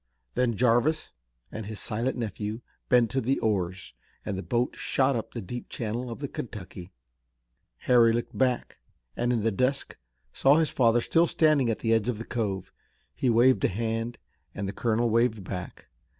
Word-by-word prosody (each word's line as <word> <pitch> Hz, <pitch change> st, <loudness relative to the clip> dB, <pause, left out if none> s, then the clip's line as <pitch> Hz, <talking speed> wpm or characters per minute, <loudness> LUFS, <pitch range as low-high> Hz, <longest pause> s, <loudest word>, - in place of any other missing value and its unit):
Then 120 Hz, -2 st, +1 dB
Jarvis 125 Hz, +7 st, +2 dB, 0.4 s
and 110 Hz, -2 st, -6 dB
his 110 Hz, -1 st, -6 dB
silent 120 Hz, +4 st, -2 dB
nephew 110 Hz, 0 st, -4 dB, 0.3 s
bent 120 Hz, -2 st, +4 dB
to 135 Hz, -, 0 dB
the 130 Hz, +3 st, +1 dB
oars 95 Hz, -4 st, -2 dB, 0.3 s
and 100 Hz, -, -2 dB
the 95 Hz, -, -3 dB
boat 120 Hz, +4 st, -1 dB
shot 135 Hz, 0 st, +1 dB
up 115 Hz, -, -4 dB
the 115 Hz, -, -5 dB
deep 120 Hz, +6 st, -7 dB
channel 120 Hz, +2 st, -3 dB
of 115 Hz, -, -6 dB
the 140 Hz, -, -4 dB
Kentucky. 95 Hz, -7 st, -8 dB, 0.9 s
Harry 120 Hz, -2 st, +6 dB
looked 120 Hz, +1 st, -2 dB
back, 130 Hz, -2 st, 0 dB, 0.4 s
and 120 Hz, 0 st, 0 dB
in 115 Hz, -4 st, 0 dB
the 115 Hz, -, +2 dB
dusk 130 Hz, +6 st, -1 dB, 0.4 s
saw 135 Hz, +2 st, +5 dB
his 160 Hz, -2 st, +2 dB
father 120 Hz, -1 st, +3 dB
still 165 Hz, +7 st, +3 dB
standing 155 Hz, -7 st, +3 dB
at 115 Hz, -, 0 dB
the 115 Hz, -1 st, +2 dB
edge 115 Hz, +1 st, +2 dB
of 120 Hz, -, -1 dB
the 115 Hz, -, -7 dB
cove. 100 Hz, -6 st, -3 dB, 0.4 s
He 130 Hz, -, 0 dB
waved 120 Hz, -2 st, +4 dB
a -, -, +5 dB
hand 115 Hz, +3 st, -2 dB, 0.4 s
and 100 Hz, -1 st, -3 dB
the 100 Hz, -, -4 dB
colonel 115 Hz, +1 st, +1 dB
waved 115 Hz, -2 st, +1 dB
back. 90 Hz, -1 st, -7 dB
115 Hz, 180 wpm, -27 LUFS, 110-125 Hz, 0.9 s, Harry